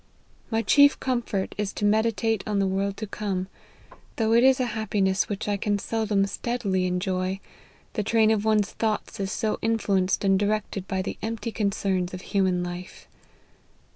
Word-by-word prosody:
My 225 Hz, -1 st, 0 dB
chief 285 Hz, +2 st, +5 dB
comfort 240 Hz, -6 st, -1 dB
is 205 Hz, -2 st, -1 dB
to 205 Hz, -, -2 dB
meditate 220 Hz, 0 st, +1 dB
on 210 Hz, -1 st, 0 dB
the 195 Hz, -, +2 dB
world 195 Hz, +1 st, -1 dB
to 215 Hz, -, -4 dB
come, 195 Hz, -3 st, -3 dB, 0.7 s
though 225 Hz, -1 st, +1 dB
it 235 Hz, +1 st, +5 dB
is 265 Hz, 0 st, +5 dB
a 255 Hz, -, +2 dB
happiness 200 Hz, -3 st, 0 dB
which 205 Hz, 0 st, -3 dB
I 205 Hz, -1 st, +1 dB
can 205 Hz, +1 st, 0 dB
seldom 210 Hz, -2 st, 0 dB
steadily 200 Hz, -4 st, -1 dB
enjoy, 185 Hz, +1 st, -1 dB, 0.5 s
the 215 Hz, -, -1 dB
train 220 Hz, +1 st, +3 dB
of 215 Hz, -2 st, +1 dB
one's 215 Hz, -2 st, +2 dB
thoughts 215 Hz, -2 st, -2 dB
is 195 Hz, 0 st, -2 dB
so 215 Hz, 0 st, -1 dB
influenced 200 Hz, -5 st, +1 dB
and 195 Hz, -1 st, +4 dB
directed 205 Hz, -2 st, -1 dB
by 190 Hz, -1 st, -1 dB
the -, -, -5 dB
empty 225 Hz, +1 st, -3 dB
concerns 195 Hz, -4 st, -1 dB
of 185 Hz, -, -8 dB
human 185 Hz, -3 st, +1 dB
life. 175 Hz, +1 st, -7 dB
205 Hz, 170 wpm, -26 LUFS, 190-220 Hz, 0.7 s, chief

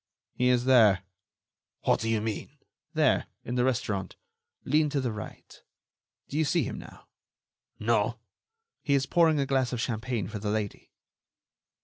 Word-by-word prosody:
"He 125 Hz, -, +1 dB
is 125 Hz, -1 st, +2 dB
there." 110 Hz, -8 st, +5 dB, 0.8 s
"What -, -, +3 dB
do 115 Hz, -, -2 dB
you 110 Hz, -2 st, +1 dB
mean?" 110 Hz, -1 st, -4 dB, 0.4 s
"There... -, -, +3 dB, 0.2 s
in 120 Hz, -, -4 dB
the 125 Hz, 0 st, +2 dB
restaurant. 105 Hz, -7 st, -1 dB, 0.5 s
Lean 150 Hz, +2 st, +3 dB
to 145 Hz, -1 st, 0 dB
the 125 Hz, -3 st, -1 dB
right.... 105 Hz, 0 st, -9 dB, 0.7 s
Do 145 Hz, -, -2 dB
you -, -, +4 dB
see 160 Hz, +3 st, +2 dB
him -, -, -5 dB
now?" -, -, -13 dB, 0.7 s
"No." -, -, +1 dB, 0.6 s
"He 140 Hz, -, +2 dB
is 135 Hz, -1 st, +2 dB
pouring 160 Hz, 0 st, +3 dB
a 140 Hz, -, +1 dB
glass 130 Hz, -2 st, +1 dB
of 125 Hz, -, -2 dB
champagne 115 Hz, -3 st, -2 dB
for 105 Hz, 0 st, -6 dB
the 105 Hz, +1 st, -3 dB
lady." 105 Hz, -1 st, -3 dB
125 Hz, 155 wpm, -28 LUFS, 110-135 Hz, 0.8 s, there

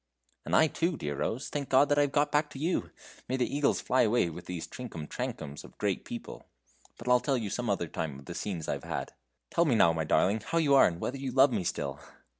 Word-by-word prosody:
"And -, -, 0 dB
I 160 Hz, -, +7 dB
too, 165 Hz, +2 st, -1 dB
dear 75 Hz, -1 st, -3 dB
Rose, 120 Hz, +5 st, -2 dB
thank 145 Hz, -2 st, -4 dB
God 135 Hz, +2 st, +5 dB
that 145 Hz, 0 st, +3 dB
I -, -, +6 dB
have 145 Hz, -1 st, +1 dB
got 145 Hz, +1 st, +2 dB
back 150 Hz, 0 st, +2 dB
to -, -, -10 dB
you. 165 Hz, +6 st, -1 dB, 0.4 s
May 130 Hz, -, 0 dB
the 125 Hz, -, +2 dB
eagles 145 Hz, -1 st, +2 dB
fly 130 Hz, -, +2 dB
away 110 Hz, -6 st, +2 dB
with 90 Hz, +2 st, -10 dB
these 90 Hz, -2 st, -4 dB
trinkum 110 Hz, -12 st, -7 dB
trankums 70 Hz, +1 st, -5 dB
of -, -, -15 dB
great -, -, -1 dB
people. -, -, -8 dB, 0.5 s
But 115 Hz, -, -11 dB
I'll 125 Hz, 0 st, +5 dB
tell 135 Hz, +1 st, 0 dB
you 110 Hz, -5 st, -3 dB
some 120 Hz, -2 st, -2 dB
other 95 Hz, -4 st, 0 dB
time 75 Hz, -3 st, -4 dB
of 70 Hz, -, -13 dB
the 85 Hz, -, -6 dB
scenes 85 Hz, -3 st, -4 dB
I've -, -, -2 dB
had. -, -, -4 dB, 0.4 s
Tell 170 Hz, -, +3 dB
me 135 Hz, -7 st, +3 dB
now, 85 Hz, -6 st, +5 dB
my 80 Hz, -1 st, -1 dB
darling, 100 Hz, +7 st, +3 dB
how 165 Hz, -, -2 dB
you 150 Hz, -4 st, +3 dB
are, 135 Hz, -, +7 dB
and 85 Hz, -1 st, -4 dB
whether 130 Hz, -, -3 dB
you 135 Hz, -1 st, -4 dB
love 135 Hz, +2 st, +5 dB
me 100 Hz, -5 st, 0 dB
still!" 70 Hz, -5 st, -3 dB
125 Hz, 250 wpm, -30 LUFS, 85-140 Hz, 0.5 s, I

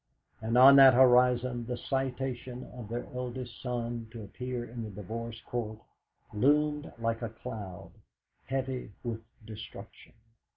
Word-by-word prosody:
And 115 Hz, +2 st, 0 dB
on 135 Hz, +2 st, +10 dB
that 135 Hz, -2 st, +9 dB
horizon 125 Hz, -1 st, +4 dB
the 125 Hz, -1 st, -3 dB
citation 130 Hz, -2 st, -3 dB
of 120 Hz, -4 st, -8 dB
their 120 Hz, +1 st, -3 dB
eldest 125 Hz, -1 st, -5 dB
son 120 Hz, -2 st, -3 dB
to 115 Hz, -1 st, -8 dB
appear 125 Hz, +3 st, -5 dB
in 120 Hz, 0 st, -7 dB
the 110 Hz, -, -6 dB
Divorce 115 Hz, +4 st, -6 dB
Court 110 Hz, -3 st, -3 dB, 0.6 s
loomed 150 Hz, +6 st, +2 dB
like 115 Hz, 0 st, -1 dB
a 115 Hz, -, -2 dB
cloud, 105 Hz, -5 st, -8 dB, 0.5 s
heavy 130 Hz, -5 st, -3 dB
with 115 Hz, -2 st, -3 dB, 0.2 s
destruction. 110 Hz, 0 st, -10 dB
120 Hz, 130 wpm, -30 LUFS, 115-130 Hz, 0.6 s, on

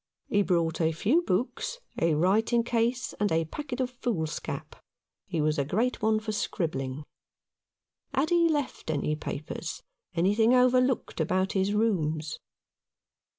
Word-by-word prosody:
He 205 Hz, -, +3 dB
brought 170 Hz, -4 st, +1 dB
a 160 Hz, 0 st, +2 dB
few 230 Hz, -, +2 dB
books, 260 Hz, -, -1 dB, 0.2 s
a 165 Hz, -2 st, +3 dB
writing 220 Hz, +8 st, +3 dB
case, 240 Hz, +1 st, 0 dB
and 205 Hz, 0 st, +1 dB
a 160 Hz, 0 st, +2 dB
packet 270 Hz, -, -6 dB
of 255 Hz, -1 st, 0 dB
foolscap. 205 Hz, -11 st, -3 dB, 0.5 s
He 170 Hz, -4 st, -2 dB
was 150 Hz, 0 st, +1 dB
a -, -, +3 dB
great 220 Hz, -, 0 dB
one 215 Hz, 0 st, +3 dB
for 215 Hz, 0 st, -4 dB
scribbling. 150 Hz, -9 st, -2 dB, 1.1 s
Had 300 Hz, +5 st, 0 dB
he 340 Hz, -1 st, +4 dB
left 290 Hz, -, -2 dB
any 150 Hz, 0 st, 0 dB
papers 150 Hz, 0 st, -5 dB, 0.2 s
— 480 Hz, -, -54 dB
anything 210 Hz, +8 st, +4 dB
overlooked 255 Hz, -5 st, +3 dB
about 185 Hz, +4 st, +1 dB
his 195 Hz, +1 st, +1 dB
rooms 160 Hz, -8 st, 0 dB
205 Hz, 140 wpm, -28 LUFS, 160-245 Hz, 1.1 s, he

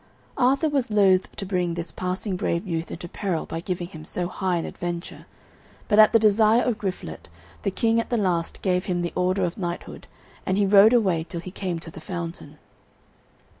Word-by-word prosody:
Arthur 270 Hz, +4 st, +3 dB
was 280 Hz, -5 st, 0 dB
loath 195 Hz, -3 st, +3 dB
to 195 Hz, -, -5 dB
bring 180 Hz, -3 st, -1 dB
this 170 Hz, 0 st, -3 dB
passing 185 Hz, +2 st, -3 dB
brave 180 Hz, 0 st, -1 dB
youth 165 Hz, -3 st, -3 dB
into 175 Hz, -, -6 dB
peril 175 Hz, -2 st, -3 dB
by 165 Hz, -, -5 dB
giving 175 Hz, 0 st, -3 dB
him 155 Hz, -4 st, -10 dB
so 175 Hz, +2 st, -3 dB
high 185 Hz, 0 st, -1 dB
an 165 Hz, -, -2 dB
adventure; 175 Hz, 0 st, -6 dB, 0.6 s
but 210 Hz, 0 st, +3 dB
at 215 Hz, -, +8 dB
the -, -, +6 dB
desire 220 Hz, +2 st, +4 dB
of 235 Hz, -4 st, -1 dB
Griflet 180 Hz, -, -5 dB, 0.3 s
the -, -, 0 dB
King 225 Hz, +4 st, +1 dB
at 230 Hz, -, -3 dB
the 240 Hz, -, +1 dB
last 180 Hz, -5 st, -1 dB
gave 180 Hz, -1 st, +1 dB
him 175 Hz, -1 st, -1 dB
the 175 Hz, -, -3 dB
order 185 Hz, +1 st, +1 dB
of 175 Hz, +1 st, -2 dB
knighthood, 175 Hz, -2 st, -5 dB, 0.4 s
and 190 Hz, -, 0 dB
he 205 Hz, -, +3 dB
rode 200 Hz, +3 st, +7 dB
away 190 Hz, -9 st, +2 dB
till 170 Hz, +1 st, -6 dB
he 185 Hz, -, -8 dB
came 185 Hz, -3 st, -3 dB
to 165 Hz, 0 st, -9 dB
the 160 Hz, -, -11 dB
fountain. 165 Hz, -3 st, -6 dB
185 Hz, 200 wpm, -24 LUFS, 170-205 Hz, 0.6 s, at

